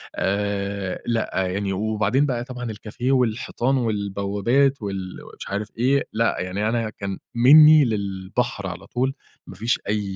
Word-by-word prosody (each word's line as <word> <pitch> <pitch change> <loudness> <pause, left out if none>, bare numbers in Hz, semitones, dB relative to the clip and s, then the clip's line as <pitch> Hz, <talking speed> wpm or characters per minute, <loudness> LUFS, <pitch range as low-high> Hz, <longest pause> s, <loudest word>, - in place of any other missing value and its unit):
آآ، 100 -1 -2
لأ 115 -2 -1 0.2
يعني، 95 +1 -2
وبعدين 110 +6 +1
بقى 120 -4 -2
طبعًا 125 -3 -6
الcafe 110 +3 -8
والحيطان 125 +1 +1
والبوابات، 110 +4 0
وال 95 -2 -5 0.2
مش - - -8
عارف 100 +2 -3
إيه، 135 +4 +2
لأ، 115 +1 +1
يعني 95 +4 -2
أنا 115 -1 -1
كان 100 -2 -6 0.2
مني 150 +4 +8
للبحر 100 +1 -2
على 90 +2 -8
طول، 130 +2 -1 0.3
ما 95 - -10
فيش 115 +5 0
أي 105 0 0
110 Hz, 140 wpm, -23 LUFS, 100-125 Hz, 0.3 s, مني